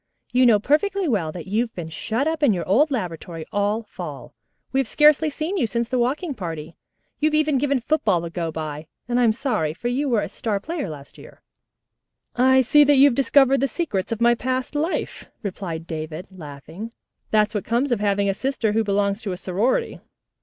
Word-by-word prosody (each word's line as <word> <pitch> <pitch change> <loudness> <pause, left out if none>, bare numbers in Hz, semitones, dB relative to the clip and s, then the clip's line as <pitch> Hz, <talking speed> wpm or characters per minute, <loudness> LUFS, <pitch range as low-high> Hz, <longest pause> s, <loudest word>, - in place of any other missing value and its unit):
"You 250 0 +5
know 225 -3 +6
perfectly 365 - +1
well 190 - 0
that 170 -1 -8
you've 225 +5 -1
been 165 -3 -6
shut 225 - -2
up 320 -1 -1
in 275 -7 +4
your 175 -3 -3
old 265 +12 +4
laboratory 170 - -4
all 205 +2 0
fall. 210 - -8 0.4
We 265 - +1
have 270 - 0
scarcely 300 +4 +4
seen 315 +6 -3
you 240 - +1
since 235 +1 -1
the 255 +1 -1
walking 285 +7 -1
party. 165 - -6 0.4
You 310 - +3
have 305 - +1
even 305 -3 +2
given 280 -1 +1
football 240 - +1
the 170 0 -6
go 165 -2 -3
by, 155 -1 -6 0.2
and 245 0 +1
I'm 235 -3 +4
so 260 +5 -3
sorry, 160 -7 0
for 240 +7 -3
you 275 +3 -1
were 230 -4 +2
a - - -3
star 210 -3 -2
player 300 - -4
last 145 -2 -10
year." - - -15 0.9
"I 260 +1 +5
see 295 +5 +5
you 275 -1 +7
have 285 - +4
discovered 275 +1 +4
the 275 - +2
secrets 240 - -3
of 225 - -2
my 240 0 +5
past 255 +3 -2
life," 310 +4 -3
replied 180 -5 -5
David, 160 +1 -6
laughing. 165 +6 -9 0.4
"That's 210 0 +2
what 210 - -2
comes 245 +4 0
of 240 - +1
having 200 -1 +1
a 195 - +2
sister 250 -1 -1
who 225 +1 +1
belongs 200 0 0
to 200 -3 -3
a - - -6
sorority. 215 - -1
225 Hz, 205 wpm, -23 LUFS, 185-275 Hz, 0.9 s, you